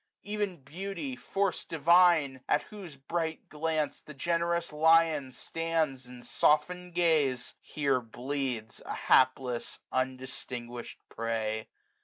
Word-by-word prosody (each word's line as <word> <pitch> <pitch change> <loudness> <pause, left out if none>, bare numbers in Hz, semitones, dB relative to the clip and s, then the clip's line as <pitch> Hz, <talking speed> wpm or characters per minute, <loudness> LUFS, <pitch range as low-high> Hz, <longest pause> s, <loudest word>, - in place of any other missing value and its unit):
Ev'n 205 -3 -2
beauty, 165 -2 -5
force 195 +9 -1
divine! 165 -4 +4
at 150 - +3
whose 190 -8 -10
bright 160 +4 -3
glance 155 -1 -1
405 - - -27
The 150 - -8
generous 170 +2 0
lion 160 -3 +4
stands 155 -2 -2
in 125 -1 -11
softened 180 +4 +1
gaze. 150 -8 +2
Here 140 -4 0
bleeds, 125 -1 -4
a - - -4
hapless 130 -2 +2
undistinguished 130 -2 -4
prey. 110 -1 -2
150 Hz, 110 wpm, -30 LUFS, 130-170 Hz, -, divine